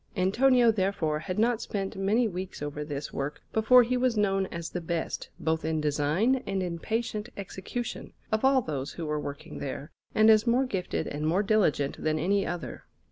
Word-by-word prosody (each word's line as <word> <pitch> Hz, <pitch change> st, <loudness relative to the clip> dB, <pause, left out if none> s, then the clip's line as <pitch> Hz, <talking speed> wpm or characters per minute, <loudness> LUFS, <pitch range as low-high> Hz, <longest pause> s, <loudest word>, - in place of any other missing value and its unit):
Antonio, 240 Hz, +6 st, +4 dB
therefore, 185 Hz, -7 st, 0 dB
had 180 Hz, +4 st, -4 dB
not 230 Hz, +1 st, +2 dB
spent 195 Hz, -2 st, -3 dB
many 210 Hz, +5 st, +2 dB
weeks 185 Hz, -5 st, -5 dB
over 145 Hz, 0 st, -4 dB
this 145 Hz, -1 st, -5 dB
work 140 Hz, +2 st, -4 dB
before 245 Hz, +3 st, +6 dB
he 250 Hz, +2 st, 0 dB
was 250 Hz, -2 st, +1 dB
known 195 Hz, -2 st, +2 dB
as 170 Hz, -1 st, -6 dB
the 180 Hz, -, -3 dB
best, 165 Hz, 0 st, -3 dB
both 160 Hz, 0 st, 0 dB
in 160 Hz, 0 st, 0 dB
design 150 Hz, -, +1 dB
and 195 Hz, -1 st, -1 dB
in 170 Hz, -2 st, -3 dB
patient 220 Hz, +1 st, -2 dB
execution, 200 Hz, +4 st, -5 dB, 0.2 s
of 220 Hz, +2 st, +1 dB
all 265 Hz, -1 st, +4 dB
those 145 Hz, -4 st, -4 dB
who 170 Hz, -, -5 dB
were 150 Hz, 0 st, -1 dB
working 145 Hz, -1 st, -7 dB
there, 140 Hz, +3 st, -5 dB, 0.2 s
and 220 Hz, +1 st, +7 dB
as 215 Hz, +1 st, +4 dB
more 250 Hz, +3 st, +3 dB
gifted 190 Hz, -8 st, -2 dB
and 150 Hz, +1 st, -3 dB
more 180 Hz, +6 st, +2 dB
diligent 190 Hz, -10 st, +1 dB
than 155 Hz, 0 st, +1 dB
any 195 Hz, +5 st, +1 dB
other. 170 Hz, 0 st, -5 dB
190 Hz, 190 wpm, -28 LUFS, 155-220 Hz, 0.2 s, and